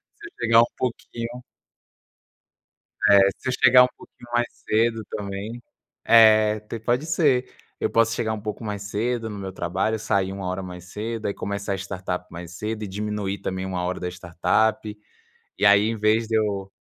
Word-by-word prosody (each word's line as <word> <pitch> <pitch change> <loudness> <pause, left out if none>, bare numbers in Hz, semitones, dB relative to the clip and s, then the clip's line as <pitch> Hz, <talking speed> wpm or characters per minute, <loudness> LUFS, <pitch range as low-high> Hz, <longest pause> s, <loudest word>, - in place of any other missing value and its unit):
se - - -19
eu - - -14
chegar 115 -1 +5
um - - +4
pouquinho. 120 0 -4 1.7
É 100 - +8 0.2
se - - -4
eu - - 0
chegar 125 +1 +8
um - - +3
pouquinho 120 -1 -16
mais 120 0 +2 0.2
cedo, 115 +1 +1
também, 100 +4 -5 0.4
é 110 -1 +6
te 110 +2 -7
pode 120 +6 0
ser. 145 -6 +2 0.3
Eu - - 0
posso 115 0 +3
chegar, 110 -2 -1
um 110 - -4
pouco 105 +2 -5
mais 105 -2 -4
cedo 115 +3 -2
no 105 - -6
meu 95 -1 -5
trabalho, 95 +5 -1
sair 95 -3 0
uma 95 -1 -5
hora 95 +1 -3
mais 90 -1 -9
cedo, 110 +1 -4
aí 100 - 0
começar 100 0 -3
a - - 0
startup 95 -2 -4
mais 85 0 -8
cedo, 110 +1 -4
e - - -4
diminuir 105 0 -3
também, 95 0 -3
uma 90 -2 -3
hora 90 +1 -2
da 90 - -3
startup. 100 +5 0 0.6
E - - 0
aí, 100 +1 +6
em 115 - -2
vez 110 +1 +2
de 110 - +1
eu, 100 -3 -1
105 Hz, 185 wpm, -24 LUFS, 95-115 Hz, 1.7 s, É